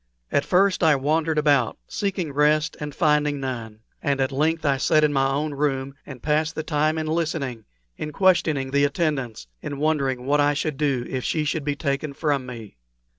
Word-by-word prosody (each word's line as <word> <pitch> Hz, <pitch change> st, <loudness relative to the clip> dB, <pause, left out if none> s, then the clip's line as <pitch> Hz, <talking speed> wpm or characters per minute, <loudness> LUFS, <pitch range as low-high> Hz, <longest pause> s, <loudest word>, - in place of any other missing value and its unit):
At 140 Hz, -, +1 dB
first 195 Hz, +1 st, +3 dB
I 160 Hz, -3 st, +5 dB
wandered 155 Hz, +3 st, 0 dB
about, 145 Hz, -6 st, +2 dB
seeking 190 Hz, -7 st, -3 dB
rest 150 Hz, +2 st, +2 dB
and 150 Hz, -1 st, -6 dB
finding 150 Hz, -1 st, +2 dB
none; 115 Hz, -5 st, -5 dB, 0.2 s
and 140 Hz, -1 st, 0 dB
at 135 Hz, 0 st, +1 dB
length 155 Hz, +3 st, 0 dB
I 140 Hz, -2 st, +3 dB
sat 155 Hz, +3 st, +3 dB
in 150 Hz, -1 st, +3 dB
my 135 Hz, -1 st, +2 dB
own 145 Hz, +2 st, -1 dB
room, 140 Hz, -2 st, -1 dB
and 130 Hz, -4 st, -10 dB
passed 155 Hz, +1 st, +1 dB
the 155 Hz, -, -3 dB
time 155 Hz, +1 st, 0 dB
in 155 Hz, -, -2 dB
listening, 155 Hz, -8 st, -2 dB, 0.3 s
in 150 Hz, -, -5 dB
questioning 160 Hz, -7 st, +2 dB
the 140 Hz, +1 st, +3 dB
attendants, 140 Hz, -, -1 dB, 0.2 s
in 145 Hz, -, -5 dB
wondering 140 Hz, -4 st, 0 dB
what 145 Hz, +2 st, +3 dB
I 145 Hz, 0 st, +2 dB
should 150 Hz, -1 st, -2 dB
do 140 Hz, -5 st, 0 dB
if 130 Hz, -1 st, -3 dB
she 155 Hz, -2 st, 0 dB
should 150 Hz, +1 st, -1 dB
be 145 Hz, 0 st, -1 dB
taken 140 Hz, 0 st, -2 dB
from 140 Hz, -3 st, -1 dB
me. 115 Hz, -, -9 dB
145 Hz, 190 wpm, -24 LUFS, 135-155 Hz, 0.3 s, I